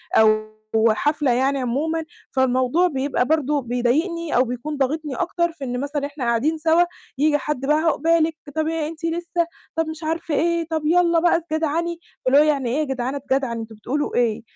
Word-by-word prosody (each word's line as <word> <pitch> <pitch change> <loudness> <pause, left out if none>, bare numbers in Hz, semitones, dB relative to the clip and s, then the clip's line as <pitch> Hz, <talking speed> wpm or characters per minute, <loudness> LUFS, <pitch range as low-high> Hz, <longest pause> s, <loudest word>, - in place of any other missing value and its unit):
أو 215 0 +4 0.4
حفلة 290 +2 +1
يعني 265 +3 +1
عمومًا، 305 +7 -1 0.3
فالموضوع 260 +6 +2
بيبقى 270 -4 0
برضو 300 -1 +1
بيضايقني 300 +8 0
أو 250 - +5
بيكون 250 +5 -4
ضاغطني 285 +1 -1
أكتر 340 -1 0
في 285 -4 -11
إن 250 -1 -3
مثلًا 285 0 -2
إحنا 285 -2 -6
قاعدين 250 +8 +1
سوا، 325 +2 +4 0.3
ييجي 295 +1 +3
حد 295 -3 -3
بقى 300 +2 +3
"عُقبالِك" 325 0 +2 0.2
طَب 315 0 0
"إيه 320 -2 -1
أنتِ 330 +1 -7
لسه؟" 340 +1 -1 0.3
طَب 325 -1 0
مش 315 0 -7
عارف 325 0 -3
إيه؟ 335 +2 +1
طَب 315 -2 -2
"يالّا 340 0 +4
بقى 345 +1 +3
اتجدعني." 330 +1 -2 0.3
فاللي 265 +2 +5
هو 300 - +7
يعني 280 -5 +1
إيه 275 +6 0
يا - - +2
جدعان 265 -1 -2
اتجدعن؟ 265 -3 -1
أنتم 225 -1 -8
بتقولوا 270 +8 -3
إيه؟ 235 -3 +1
300 Hz, 180 wpm, -22 LUFS, 260-325 Hz, 0.4 s, هو